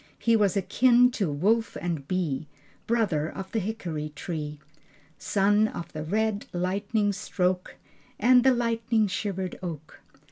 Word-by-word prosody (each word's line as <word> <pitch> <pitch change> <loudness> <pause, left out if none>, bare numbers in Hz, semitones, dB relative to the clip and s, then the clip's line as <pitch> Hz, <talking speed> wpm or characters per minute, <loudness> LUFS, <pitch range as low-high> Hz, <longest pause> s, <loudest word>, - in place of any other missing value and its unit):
He 230 -1 +2
was 205 -3 +2
akin 245 +5 +4
to 195 -10 -1
wolf 215 +10 +1
and 165 -6 -3
bee, 160 -5 -1 0.4
Brother 200 -10 +1
of 190 -1 -8
the 225 - 0
hickory 180 -8 -4
tree. 150 -2 -5 0.6
Son 205 +2 +3
of 170 -5 -7
the 155 - -4
red 215 +4 -1
lightning 200 +4 0
stroke 185 -2 -1 0.4
And 250 0 +6
the 265 - +6
lightning 230 -2 +1
shivered 190 -2 -3
oak. 160 -4 -7
195 Hz, 135 wpm, -27 LUFS, 170-220 Hz, 0.6 s, And